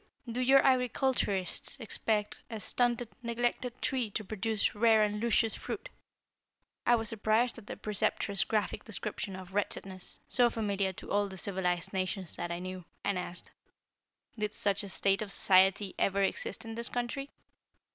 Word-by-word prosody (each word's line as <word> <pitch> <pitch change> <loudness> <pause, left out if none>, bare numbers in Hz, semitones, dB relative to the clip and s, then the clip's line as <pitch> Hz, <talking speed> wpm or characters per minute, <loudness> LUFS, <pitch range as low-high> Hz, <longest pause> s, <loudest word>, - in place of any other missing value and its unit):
Do 235 +2 -2
your 270 +2 +6
agriculturists 255 -4 +1
expect 215 -2 -1
a 225 -2 -5
stunted, 240 +3 +1
neglected 240 +1 -1
tree 255 -4 0
to 215 +1 -3
produce 215 +1 0
rare 220 0 +5
and 210 0 -1
luscious 230 -1 +2
fruit?" - - -5 1.0
I 240 - +7
was 225 -2 0
surprised 225 +2 +1
at 210 - -16
the - - -6
Preceptress' 210 -2 +1
graphic 215 -2 -1
description 215 -3 -4
of 190 0 -10
wretchedness, 195 -2 -3
so 245 -2 +4
familiar 200 -4 0
to - - -9
all 205 0 +2
the 190 -1 -9
civilized 180 -2 -1
nations 185 -1 -2
that 175 - -3
I 170 - -2
knew, 185 0 -6 0.2
and 200 - +1
asked: 175 -1 -7 0.9
"Did 210 0 -2
such 200 -1 +3
a 200 - -6
state 195 +1 +2
of 210 -2 -4
society 190 0 +4
ever 200 0 +2
exist 195 +2 -1
in 225 - -6
this 235 +1 -2
country?" 245 +3 -3
210 Hz, 155 wpm, -31 LUFS, 195-235 Hz, 1.0 s, I